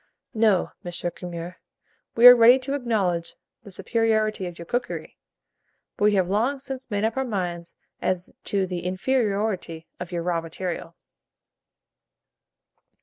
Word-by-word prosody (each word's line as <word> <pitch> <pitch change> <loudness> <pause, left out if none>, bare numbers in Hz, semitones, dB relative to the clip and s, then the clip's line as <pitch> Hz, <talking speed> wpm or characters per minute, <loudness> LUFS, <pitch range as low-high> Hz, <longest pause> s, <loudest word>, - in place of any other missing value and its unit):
'" - - -57
No, 195 -4 +2
M. 175 - -5 0.2
Curmer, 175 0 -7 0.6
we 235 - +5
are 245 0 +13
ready 240 +2 +7
to 265 +1 -4
acknowledge 205 -11 -1 0.3
the 210 - -13
superiority 215 -1 0
of 175 -1 -9
your 170 - -8
cookery, 245 +8 -4 0.8
but 205 - +1
we 210 -1 +4
have 185 -2 +2
long 230 +9 +1
since 265 -1 -7
made 205 -1 -1
up 225 +3 0
our 265 - +1
minds 180 -7 -4 0.3
as 185 -1 -2
to 195 -2 0
the 180 -1 -4
inferiority 195 -4 -1
of 180 0 -6
your 170 -1 -2
raw 170 -1 0
material. 165 0 -5
195 Hz, 145 wpm, -24 LUFS, 175-230 Hz, 0.8 s, are